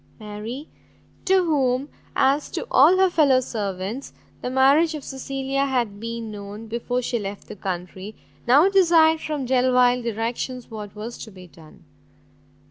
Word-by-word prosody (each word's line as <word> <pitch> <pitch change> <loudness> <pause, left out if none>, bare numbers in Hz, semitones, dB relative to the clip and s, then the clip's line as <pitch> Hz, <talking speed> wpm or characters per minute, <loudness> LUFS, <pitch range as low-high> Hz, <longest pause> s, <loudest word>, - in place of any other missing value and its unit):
Mary, 215 +7 -7 0.6
to 375 0 +4
whom, 270 -4 +1 0.3
as 275 +2 +2
to - - -4
all 370 - +6
her 380 0 +5
fellow 280 -6 +4
servants, 210 +1 -4 0.3
the - - -3
marriage 280 +5 +4
of 295 - -7
Cecilia 270 +1 -3
had 235 -6 -1
been 230 0 -5
known, 205 +1 -8
before 240 +2 -3
she 240 0 -1
left 200 -1 -7
the - - -8
country, 185 +2 -6 0.3
now 285 +9 +6
desired 330 -5 +4
from 295 -4 -3
Delvile 250 -1 +3
directions 235 +2 -4
what 210 -2 -8
was 220 +3 -7
to - - -8
be 185 -3 -13
done. 165 -2 -18
250 Hz, 145 wpm, -23 LUFS, 210-275 Hz, 0.6 s, all